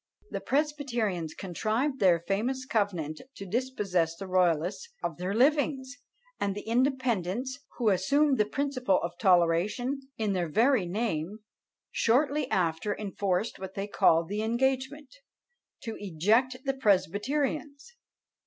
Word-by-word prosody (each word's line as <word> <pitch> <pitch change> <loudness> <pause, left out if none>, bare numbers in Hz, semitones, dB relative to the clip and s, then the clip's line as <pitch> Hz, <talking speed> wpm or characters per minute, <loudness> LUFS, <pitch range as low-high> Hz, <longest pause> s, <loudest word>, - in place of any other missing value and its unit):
The - - -3
presbyterians 240 - -1
contrived 220 - -1
their 175 -4 +4
famous 240 +9 -1
covenant 180 - -1
to 200 - -8
dispossess 195 -7 -1
the 195 - -7
royalists 180 - +1
of 170 - -3
their 185 +3 -2
livings; 270 0 +2 0.4
and 200 -1 -1
the 205 - -6
independents, 250 -1 0 0.2
who 235 -4 +2
assumed 270 +9 +2
the 210 - +4
principle 255 -4 0
of 170 0 -4
toleration 190 +8 +2 0.2
in 215 -3 0
their 175 -3 -1
very 225 - +3
name, 200 -1 -2 0.5
shortly 280 +3 +2
after 175 +3 0
enforced 200 0 -2
what 190 0 -7
they 195 - -2
called 165 -5 +3
the 205 +3 -2
engagement, 265 +5 -1 0.7
to 225 -2 -5
eject 205 +8 +1
the 270 - +1
presbyterians! 270 - 0
215 Hz, 125 wpm, -29 LUFS, 185-265 Hz, 0.7 s, their